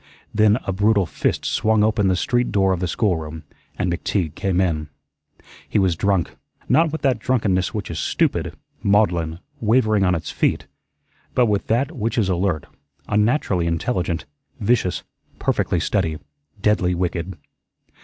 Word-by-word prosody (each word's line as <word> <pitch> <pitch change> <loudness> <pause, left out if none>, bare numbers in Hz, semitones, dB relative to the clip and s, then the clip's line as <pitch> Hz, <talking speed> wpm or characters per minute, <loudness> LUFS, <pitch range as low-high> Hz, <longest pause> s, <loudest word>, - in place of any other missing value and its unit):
Then 105 0 +4
a 95 - -1
brutal 100 0 +3
fist 75 - -1
swung 110 -1 +2
open 105 -2 +2
the 95 - +3
street 120 +5 0
door 95 -2 +3
of 90 - -2
the 90 - -1
schoolroom 80 -6 -1 0.3
and 90 -2 0
McTeague 85 -2 -1
came 95 +1 0
in. 80 -5 0 0.8
He - - 0
was 95 -4 +3
drunk; 95 0 0 0.3
not 165 -1 +3
with 160 - -5
that 130 -5 +2
drunkenness 105 -7 +1
which 100 -4 -4
is 80 - -4
stupid, - - 0 0.3
maudlin, 90 -6 +2 0.2
wavering 110 -3 +3
on 90 -1 +3
its 80 - -4
feet, - - 0 0.7
but 125 - +5
with 105 -3 0
that 130 +6 +1
which 115 -1 -2
is 105 -5 +2
alert, 90 -4 0 0.4
unnaturally 105 - +1
intelligent, 85 -1 -1 0.3
vicious, 105 -4 +1 0.3
perfectly 90 - 0
steady, 85 -4 0 0.4
deadly 100 -3 +2
wicked. 90 +1 -2
95 Hz, 145 wpm, -22 LUFS, 85-110 Hz, 0.8 s, but